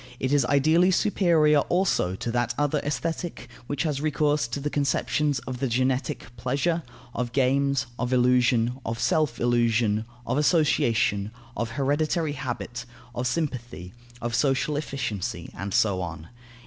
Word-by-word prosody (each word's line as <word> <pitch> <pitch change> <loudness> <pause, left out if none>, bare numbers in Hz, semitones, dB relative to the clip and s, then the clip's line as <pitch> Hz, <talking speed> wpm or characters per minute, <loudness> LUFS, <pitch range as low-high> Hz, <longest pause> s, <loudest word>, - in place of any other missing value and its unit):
It 130 +2 0
is 145 -2 +4
ideally 155 +7 +4
superior 170 -6 +3
also 175 - +1
to 115 - -4
that 120 0 0
other 145 0 +1
Aesthetic, 165 +4 -3 0.2
which 145 -1 -1
has 150 -4 -1
recourse 150 -2 +1
to 120 +4 -4
the 145 +1 -3
conceptions 145 0 +1
of 130 -1 -5
the 135 - 0
genetic 130 +1 -1
pleasure, 140 +8 0 0.3
of 120 -1 -3
games, 140 0 +2
of 125 0 -1
illusion, 125 -1 +3
of 115 0 -3
self 150 -1 +1
illusion, 115 -2 +2 0.2
of 145 - 0
association, 115 - +2 0.3
of 115 - -2
hereditary 150 +3 0
habit, 125 -2 -5 0.3
of 120 +1 -2
sympathy, 125 - -3 0.3
of 120 0 -2
social 140 +4 +1
efficiency, 135 - -4
and 100 +1 -5
so 95 -1 +2
on. 80 -2 -6
135 Hz, 140 wpm, -26 LUFS, 120-150 Hz, 0.3 s, is